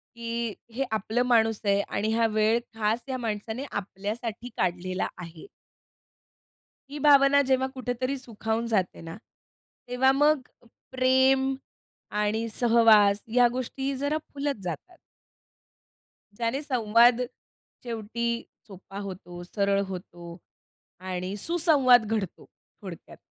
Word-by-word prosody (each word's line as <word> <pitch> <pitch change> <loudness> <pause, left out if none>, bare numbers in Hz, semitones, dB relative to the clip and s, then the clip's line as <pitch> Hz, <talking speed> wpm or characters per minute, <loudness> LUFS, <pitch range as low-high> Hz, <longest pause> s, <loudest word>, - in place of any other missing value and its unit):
की 235 -1 -3 0.2
हे 270 - -1
आपलं 220 +3 0
माणूस 225 -3 +3
आहे 200 0 +3
आणि 215 +2 -1
हा 230 0 +3
वेळ 215 +1 +2 0.2
खास 225 +2 0
या 260 - -2
माणसाने 225 +2 -4
आपल्यासाठी 210 +4 -5
काढलेला 185 +1 -1
आहे. 170 -2 -10 1.5
ही 295 - -6
भावना 280 -1 +6
जेव्हा 265 -1 +1
कुठेतरी 255 +1 -2
सुखावून 225 -2 -3
जाते 200 -6 -1
ना, 165 +1 -8 0.7
तेव्हा 250 +2 +3
मग 295 +1 +3 0.5
प्रेम 260 +1 +3 0.6
आणि 210 +2 0
सहवास 220 -4 +5
ह्या 245 +2 +4
गोष्टी 265 +2 -3
जरा 285 +3 0 0.2
फुलत 280 -6 -3
जातात 260 - -6 1.4
ज्याने 235 +6 -2
संवाद 235 -2 +4 0.6
शेवटी 235 0 -4 0.4
सोपा 195 0 -11
होतो, 180 -3 -8
सरळ 200 +1 0
होतो, 175 -2 -8 0.7
आणि 185 +2 -3
सुसंवाद 280 - +4
घडतो 195 -5 -4 0.4
थोडक्यात. 185 -4 -10
230 Hz, 110 wpm, -27 LUFS, 205-255 Hz, 1.5 s, भावना